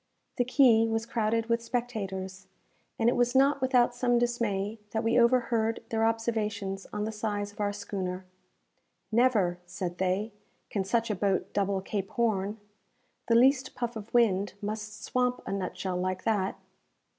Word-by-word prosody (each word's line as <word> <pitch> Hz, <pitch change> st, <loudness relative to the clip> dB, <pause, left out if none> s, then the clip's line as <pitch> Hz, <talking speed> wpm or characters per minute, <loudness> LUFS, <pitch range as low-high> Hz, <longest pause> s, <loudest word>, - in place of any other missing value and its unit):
The 245 Hz, -, +2 dB
quay 240 Hz, -3 st, +5 dB
was 225 Hz, 0 st, -1 dB
crowded 230 Hz, -1 st, 0 dB
with 230 Hz, 0 st, +1 dB
spectators, 195 Hz, -6 st, -4 dB, 0.5 s
and 225 Hz, -, +2 dB
it 240 Hz, -, +4 dB
was 245 Hz, +1 st, +1 dB
not 275 Hz, +1 st, +4 dB
without 250 Hz, -2 st, +3 dB
some 245 Hz, 0 st, +2 dB
dismay 225 Hz, -3 st, -1 dB
that 220 Hz, +1 st, -2 dB
we 230 Hz, +2 st, +3 dB
overheard 235 Hz, -2 st, +2 dB
their 225 Hz, 0 st, +1 dB
observations 215 Hz, -4 st, -2 dB
on 210 Hz, 0 st, -2 dB
the 220 Hz, -, -2 dB
size 210 Hz, -1 st, -3 dB
of 205 Hz, -, -21 dB
our 205 Hz, -1 st, +1 dB
schooner. 190 Hz, -2 st, -4 dB, 0.9 s
"Never," 215 Hz, -7 st, +3 dB
said 180 Hz, 0 st, -5 dB
they, 190 Hz, +4 st, 0 dB, 0.4 s
"can 200 Hz, -, 0 dB
such 230 Hz, +3 st, 0 dB
a -, -, 0 dB
boat 195 Hz, 0 st, 0 dB
double 200 Hz, -1 st, 0 dB
Cape 195 Hz, 0 st, -3 dB
Horn. 215 Hz, -2 st, 0 dB, 0.7 s
The 230 Hz, -, +4 dB
least 260 Hz, +2 st, +4 dB
puff 240 Hz, -1 st, -3 dB
of 220 Hz, 0 st, -8 dB
wind 205 Hz, -5 st, +2 dB
must 215 Hz, +1 st, -5 dB
swamp 250 Hz, 0 st, 0 dB
a -, -, -4 dB
nutshell 185 Hz, -1 st, -3 dB
like 185 Hz, 0 st, -2 dB
that!" 205 Hz, -4 st, 0 dB
220 Hz, 155 wpm, -29 LUFS, 195-235 Hz, 0.9 s, quay